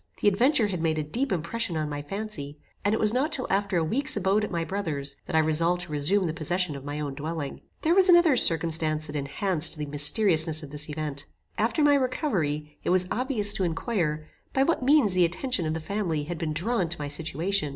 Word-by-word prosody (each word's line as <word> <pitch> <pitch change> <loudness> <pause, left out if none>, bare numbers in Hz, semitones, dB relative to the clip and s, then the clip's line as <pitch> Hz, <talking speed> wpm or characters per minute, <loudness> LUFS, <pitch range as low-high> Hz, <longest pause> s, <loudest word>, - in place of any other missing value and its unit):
The - - +1
adventure 235 +5 +3
had 180 -4 -4
made 160 -1 0
a 155 - -1
deep 245 - -3
impression 175 +2 -2
on 155 -1 -2
my 145 -1 -5
fancy, 150 -4 -6 0.3
and 205 - +1
it - - -3
was 215 0 +2
not 275 +6 0
till 260 -4 +1
after 195 -1 0
a 165 - +1
week's 270 - -1
abode 200 +2 +1
at - - -3
my 170 -2 -2
brother's, 155 -7 -4
that - - -5
I - - +5
resolved 165 +3 +2
to 175 - -9
resume 155 +7 +1
the 160 - -2
possession 175 0 -1
of 140 - -9
my 145 +1 -5
own 145 -2 -4
dwelling. 150 0 -6 0.2
There 325 - +3
was 380 0 +6
another 345 -5 +6
circumstance 160 -5 +3
that 150 - -7
enhanced 155 +3 0
the 150 - -4
mysteriousness 155 +2 +4
of 140 - -10
this 150 +1 -3
event. 150 -2 -5 0.3
After 235 +8 0
my 290 0 +5
recovery 180 - -2
it - - -2
was 185 0 +3
obvious 230 -5 +2
to 195 - -2
inquire 165 -3 -2 0.3
by 270 - +2
what 330 +1 0
means 265 -6 +3
the 180 -1 +3
attention 180 - -1
of 155 - -2
the - - -3
family 170 -3 -3
had 165 +2 -6
been 165 -2 -3
drawn 185 +2 0
to 175 - -1
my 145 - -4
situation. 165 +4 -2
170 Hz, 225 wpm, -26 LUFS, 155-215 Hz, 0.3 s, was